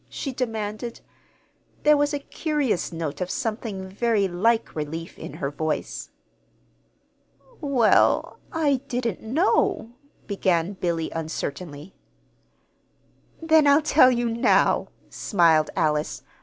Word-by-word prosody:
she 275 - -5
demanded. 225 -2 -4 0.8
There 300 0 +6
was 290 0 +1
a 290 - -1
curious 285 - -2
note 165 -1 -4
of 180 - -2
something 215 -5 -3
very 205 +1 +1
like 225 +6 0
relief 160 +2 -5
in - - -8
her 145 -3 -3
voice. 155 +1 -3 1.5
"Well, 270 -7 +3
I 300 -4 +2
didn't 240 -6 -2
know," 235 - +1 0.3
began 185 -2 0
Billy, 170 -4 -2
uncertainly. 160 0 -5 1.5
"Then 315 -2 +5
I'll 285 +2 +5
tell 290 -3 +6
you 240 -1 0
now," 230 +2 +2 0.2
smiled 165 -6 +3
Alice. 155 -3 0
215 Hz, 105 wpm, -24 LUFS, 165-255 Hz, 1.5 s, There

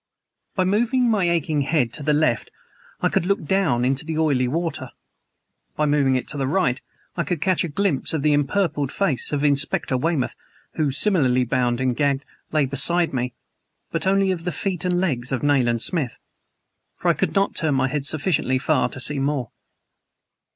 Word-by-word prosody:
By 185 - +2
moving 235 +6 +2
my 195 -5 +2
aching 160 -3 0
head 135 -5 0
to - - -6
the 150 +1 +1
left 150 -6 +1 0.5
I - - +2
could 175 - 0
look 200 -5 0
down 150 -9 +1
into 135 +1 0
the 160 0 -4
oily 140 -6 +2
water; 160 -2 -3 0.9
by 150 - +1
moving 145 -3 +2
it 130 - -2
to 150 - -4
the 135 - 0
right 145 -5 +1 0.3
I 170 - 0
could 165 +2 -2
catch 185 +2 +1
a - - -2
glimpse 180 -1 0
of 155 -3 -2
the 150 -1 +3
empurpled 145 -1 0
face 195 -11 0
of 145 -1 -1
Inspector 140 -2 +1
Weymouth, 140 0 -1 0.4
who, 155 -3 0
similarly 135 -5 +2
bound 120 -1 0
and 130 -1 0
gagged, 140 0 0 0.3
lay 155 -2 +2
beside 160 +6 +1
me, 125 -1 -2 0.6
but 165 +3 -2
only 195 0 +3
of 175 -3 -3
the 180 - -2
feet 180 +2 -3
and 180 -1 +1
legs 130 -9 -1
of 130 -1 -2
Nayland 125 -5 +2
Smith. 150 -10 -2 0.8
For - - 0
I - - +5
could - - -2
not 195 0 +2
turn 155 -4 0
my 130 0 +2
head 140 0 -1
sufficiently 150 -5 +1
far 140 +1 +1
to - - -8
see 140 +2 +3
more. 135 -4 -1
150 Hz, 185 wpm, -22 LUFS, 130-175 Hz, 0.9 s, I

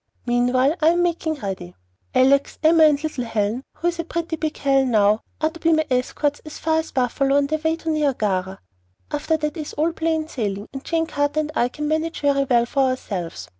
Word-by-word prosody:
Meanwhile, 250 +5 +2
I 310 - +4
am 345 +1 +4
making 335 -2 -1
ready. 195 - -6 0.4
Alex 275 +2 +3
and 315 - +6
Emma 320 -2 +7
and 290 +1 -1
little 305 -5 -2
Helen 225 +1 -1
who 345 - 0
is 340 -1 -6
a - - 0
pretty 335 0 -3
big 315 -1 -3
Helen 270 -2 +2
now 215 -1 +3 0.2
are 310 0 +1
to 335 - -12
be 330 0 +3
my 315 0 +2
escorts 285 +3 0
as 305 -1 -9
far 320 0 +1
as 320 - -4
Buffalo 270 +2 +1
on 285 - +3
their 310 +2 -1
way 320 +1 +1
to 325 -1 -3
Niagara. 210 -11 0 0.5
After 310 +2 0
that 300 0 -3
is 310 -3 -6
all 320 +3 +1
plain 320 -1 -1
sailing, 205 -8 -3
and 270 0 -7
Jane 330 -1 0
Carter 290 0 0
and 305 0 -5
I 240 - +2
can 300 +4 -4
manage 315 +2 -1
very 280 -1 +2
well 240 -3 +3
for 265 +1 +1
ourselves. 180 - -4
290 Hz, 215 wpm, -22 LUFS, 250-315 Hz, 0.5 s, Emma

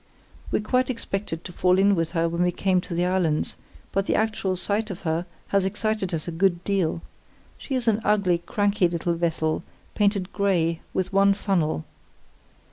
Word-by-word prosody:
We - - 0
quite 255 +4 +1
expected 195 -8 -3
to 180 - -8
fall 180 +1 +3
in 200 +1 +5
with 165 -2 -1
her 165 -1 +2
when 170 +1 -2
we 180 0 +3
came 185 0 +1
to 175 - -6
the 175 +1 +1
islands, 180 -4 +1 0.4
but 195 0 0
the - - +2
actual 215 -4 0
sight 210 +4 -1
of 195 -1 -6
her 165 +1 -1 0.2
has 200 -1 +2
excited 210 0 -1
us 165 -1 -3
a - - -2
good 175 +1 +1
deal. 185 -5 0 0.6
She 270 - -4
is 250 -2 -1
an 225 0 +3
ugly, 200 -5 +2
cranky 205 0 +1
little 170 0 -1
vessel, 165 -2 0 0.3
painted 200 -3 +1
grey, 170 -5 +1
with 190 +1 -2
one 195 0 +5
funnel. 170 - 0
185 Hz, 180 wpm, -25 LUFS, 170-200 Hz, 0.6 s, in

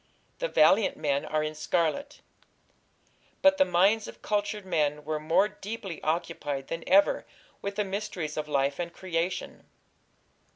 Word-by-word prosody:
The - - 0
valiant 195 - +4
men 140 0 0
are 155 0 0
in 155 0 -3
scarlet." 170 - -1 1.2
But 285 0 +6
the 285 - +6
minds 205 +4 +3
of - - -12
cultured 205 -1 -1
men 150 -4 0
were 155 -1 -2
more 165 +6 +3
deeply 205 -4 -7
occupied 155 -4 -2
than 165 0 -4
ever 195 +2 +5 0.4
with 200 0 -4
the 210 0 0
mysteries 190 -6 -4
of 155 -1 -3
life 140 0 0
and 170 -1 -3
creation. 175 0 -3
170 Hz, 140 wpm, -28 LUFS, 155-205 Hz, 1.2 s, But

